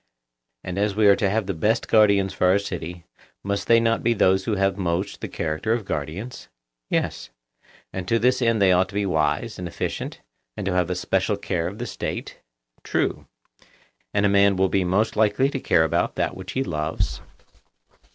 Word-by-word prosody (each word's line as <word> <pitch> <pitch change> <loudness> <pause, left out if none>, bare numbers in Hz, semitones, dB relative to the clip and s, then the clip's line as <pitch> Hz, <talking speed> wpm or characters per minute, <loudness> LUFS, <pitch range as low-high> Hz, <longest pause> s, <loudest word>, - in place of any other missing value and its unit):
And 90 +1 -4
as 100 -1 0
we 110 0 +3
are 100 -1 +7
to 100 - +1
have 110 +1 0
the 95 - -2
best 105 +8 +1
of - - -17
guardians 100 -3 +4
for 90 - +1
our 95 +2 +5
city, 90 -3 -6 0.4
must 100 0 -2
they 115 0 +6
not 115 0 +1
be 120 0 +2
those 95 -1 +3
who 110 - 0
have 95 -1 +1
most 95 +1 -2
the - - -3
character 80 +7 -2
of 115 -3 -2
guardians? 85 - -5 0.4
Yes. - - -2 0.6
And 95 -1 -5
to 115 - +2
this 125 +3 +2
end 115 -2 +2
they 95 -2 +5
ought 90 +1 +3
to 100 - -11
be 100 0 0
wise 80 -4 0
and 90 - -4
efficient, 85 - -4 0.4
and 100 - -4
to 95 - 0
have 90 -1 +1
a 90 - -1
special 95 +3 0
care 85 -4 -2
of 100 +4 -7
the 120 - -4
State? - - -5 0.4
True. - - -1 0.8
And 100 - +1
a - - +5
man 100 0 +4
will 95 0 +2
be 95 0 +1
most 100 +5 +1
likely 110 +6 +2
to 135 - -3
care 80 - +3
about 80 +2 0
that - - -1
which 95 0 -8
he 135 - 0
loves? 75 -4 -2
100 Hz, 200 wpm, -23 LUFS, 90-105 Hz, 0.8 s, are